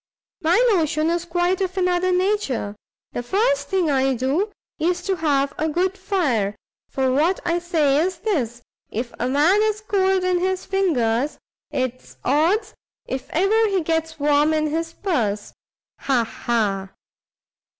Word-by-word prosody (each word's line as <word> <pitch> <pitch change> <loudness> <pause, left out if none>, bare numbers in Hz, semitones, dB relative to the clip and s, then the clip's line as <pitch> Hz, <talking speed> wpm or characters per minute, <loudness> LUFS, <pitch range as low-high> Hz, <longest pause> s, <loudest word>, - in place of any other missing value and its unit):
My 340 +2 +3 0.2
notion 315 -2 +1
is 345 0 -1
quite 350 +2 0
of 370 0 -2
another 365 0 +2
nature; 360 - 0 0.4
the - - -3
first 445 - +1
thing 370 -6 +1
I 265 -1 +2
do 280 - 0 0.3
is 350 +2 0
to 385 -1 -1
have 280 -3 +1
a 315 +1 +1
good 365 +4 0
fire; 280 - 0 0.3
for 265 -1 0
what 315 +8 +2
I 345 0 +1
say 310 -5 +2
is 370 0 -2
this, 245 - -2 0.3
if 235 +2 -4
a 245 - 0
man 315 +10 +4
is 430 -1 +1
cold 385 -3 +1
in 365 -1 +2
his 375 +1 -1
fingers, 290 -9 +1 0.3
it's 255 -1 -4
odds 350 - +2 0.3
if 260 -1 -5
ever 425 +6 +3
he 390 -2 +1
gets 320 0 -1
warm 295 +2 +3
in 305 -1 0
his 330 +1 -2
purse! 230 - -2 0.5
ha! 255 -4 +1
ha! 210 -4 -1
325 Hz, 150 wpm, -22 LUFS, 265-375 Hz, 0.5 s, man